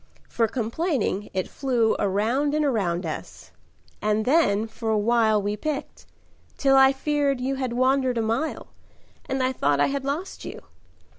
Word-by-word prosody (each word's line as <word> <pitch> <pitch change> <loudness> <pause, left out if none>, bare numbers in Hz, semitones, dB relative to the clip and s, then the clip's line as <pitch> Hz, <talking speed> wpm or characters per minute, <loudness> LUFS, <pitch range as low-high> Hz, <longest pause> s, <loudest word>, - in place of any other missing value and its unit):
For 230 -1 +1
complaining 230 - -2
it 185 -1 -2
flew 245 -5 +1
Around 230 +9 +1
and 305 0 +1
around 195 -9 0
us. - - -7 0.5
And 215 +1 +1
then 245 -8 +3
for 225 0 -5
a 220 - +2
while 220 0 +3
We 205 +1 -2
picked, 295 +6 -5 0.5
till 270 -1 +3
I 265 0 +7
feared 280 -1 0
you 265 +2 -2
had 255 -3 -2
wandered 255 0 +2
a - - +1
mile, 230 +8 -2 0.6
And 265 -1 0
I 255 - +1
thought 145 - +1
I - - +5
had 280 -1 -2
lost 295 +8 -4
you. - - -8
250 Hz, 160 wpm, -24 LUFS, 215-275 Hz, 0.6 s, I